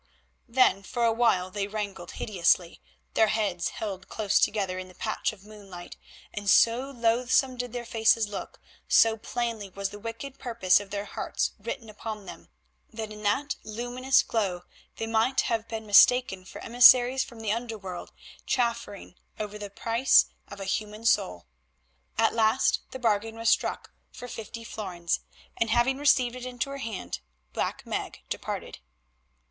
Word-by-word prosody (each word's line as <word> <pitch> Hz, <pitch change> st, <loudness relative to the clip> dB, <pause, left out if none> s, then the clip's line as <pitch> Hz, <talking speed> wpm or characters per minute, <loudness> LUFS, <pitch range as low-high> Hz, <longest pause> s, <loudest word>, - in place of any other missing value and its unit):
Then 230 Hz, -6 st, +4 dB
for 235 Hz, +4 st, -3 dB
a 230 Hz, -, +3 dB
while 210 Hz, -6 st, +2 dB
they 200 Hz, 0 st, -2 dB
wrangled 200 Hz, -4 st, -5 dB
hideously, 175 Hz, -3 st, +1 dB, 0.3 s
their 220 Hz, -, +4 dB
heads 200 Hz, -6 st, 0 dB
held 195 Hz, -3 st, -6 dB
close 210 Hz, -2 st, +1 dB
together 195 Hz, -3 st, 0 dB
in 185 Hz, -, -7 dB
the 185 Hz, -, -16 dB
patch 215 Hz, -, -1 dB
of 205 Hz, -2 st, -16 dB
moonlight, 195 Hz, -4 st, -11 dB, 0.4 s
and 205 Hz, -1 st, -3 dB
so 235 Hz, +7 st, +4 dB
loathsome 250 Hz, +1 st, +2 dB
did 245 Hz, -1 st, -4 dB
their 240 Hz, 0 st, -5 dB
faces 225 Hz, -1 st, +3 dB
look, 205 Hz, -, -7 dB, 0.3 s
so 225 Hz, -1 st, +5 dB
plainly 225 Hz, -2 st, -3 dB
was 195 Hz, +1 st, -3 dB
the 205 Hz, -, -9 dB
wicked 230 Hz, +5 st, -7 dB
purpose 210 Hz, -7 st, +3 dB
of 205 Hz, -1 st, -9 dB
their 200 Hz, 0 st, -4 dB
hearts -, -, -2 dB
written 230 Hz, +3 st, -6 dB
upon 215 Hz, -1 st, -7 dB
them, -, -, -11 dB, 0.4 s
that 220 Hz, -1 st, -6 dB
in 210 Hz, -, -10 dB
that 270 Hz, +8 st, +1 dB
faint -, -, -20 dB
luminous 245 Hz, +4 st, +1 dB
glow 195 Hz, -6 st, -1 dB, 0.3 s
they 225 Hz, -, -3 dB
might 225 Hz, +4 st, +2 dB
have 225 Hz, -1 st, -1 dB
been 220 Hz, -1 st, -5 dB
mistaken 205 Hz, -2 st, +5 dB
for -, -, -10 dB
emissaries 250 Hz, +2 st, +6 dB
from 235 Hz, -3 st, -11 dB
the 215 Hz, -2 st, -1 dB
under 230 Hz, 0 st, -3 dB
world 185 Hz, -3 st, -7 dB, 0.4 s
chaffering 235 Hz, -6 st, -1 dB, 0.3 s
over 210 Hz, 0 st, -5 dB
the 205 Hz, -1 st, -6 dB
price 230 Hz, +5 st, +4 dB, 0.2 s
of 205 Hz, -, -10 dB
a 195 Hz, -, -5 dB
human 210 Hz, +3 st, -3 dB
soul. 90 Hz, -, +1 dB, 0.7 s
At -, -, +3 dB
last 225 Hz, +3 st, +3 dB
the -, -, -7 dB
bargain 225 Hz, -2 st, 0 dB
was 230 Hz, 0 st, +2 dB
struck -, -, 0 dB, 0.2 s
for 245 Hz, -, -9 dB
fifty 230 Hz, 0 st, -8 dB
florins, 185 Hz, -7 st, -3 dB, 0.4 s
and 230 Hz, -, +1 dB
having 245 Hz, +4 st, +2 dB
received 255 Hz, -4 st, +3 dB
it 255 Hz, 0 st, -7 dB
into 250 Hz, +2 st, -3 dB
her 275 Hz, -, -6 dB
hand 205 Hz, -, -5 dB, 0.3 s
Black -, -, -3 dB
Meg -, -, -4 dB
departed. -, -, -5 dB
220 Hz, 165 wpm, -27 LUFS, 200-240 Hz, 0.7 s, emissaries